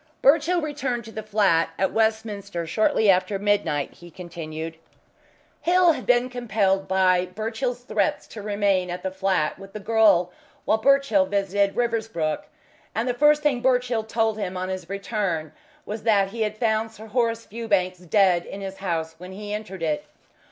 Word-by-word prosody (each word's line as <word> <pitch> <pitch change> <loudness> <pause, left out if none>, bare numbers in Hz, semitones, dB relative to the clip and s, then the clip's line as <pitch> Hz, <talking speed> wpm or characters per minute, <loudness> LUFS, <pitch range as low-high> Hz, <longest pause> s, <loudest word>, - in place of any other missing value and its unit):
"Birchill 330 +5 +4
returned 275 -6 -3
to 225 - -10
the 220 - -5
flat 200 -6 +2
at 190 - +1
Westminster 215 -5 -1
shortly 215 +4 +2
after 185 +1 +3
midnight," 195 -8 0
he 175 - -14
continued. 165 -2 -7 0.8
"Hill 360 0 +5
had - - -5
been 245 0 +4
compelled 215 -6 0
by 185 -1 +3
Birchill's 225 +6 -3
threats 220 +5 0
to 215 - -8
remain 200 -3 +1
at 175 +1 -5
the 190 - -2
flat 190 -5 0
with 195 0 -12
the 215 - -5
girl 210 -5 +3 0.3
while 220 - +2
Birchill 265 -6 +3
visited 200 0 +1
Riversbrook, 225 -10 -1 0.5
and 225 +3 0
the 250 - +1
first 295 +3 +4
thing 275 -5 +2
Birchill 250 -3 +1
told 220 0 0
him 185 -2 -3
on 185 +1 -3
his 185 -2 -5
return 195 -6 -2 0.3
was 215 +1 -5
that 205 -4 +3
he 225 +3 -6
had 215 0 -1
found 220 -1 +1
Sir 220 0 -12
Horace 230 0 0
Fewbanks 200 -5 -1
dead 180 0 +3
in 195 - -7
his 195 0 -6
house 165 -4 -2
when 180 +1 -9
he 205 +1 -6
entered 200 -4 -6
it. 155 -2 -1
205 Hz, 165 wpm, -24 LUFS, 185-230 Hz, 0.8 s, Hill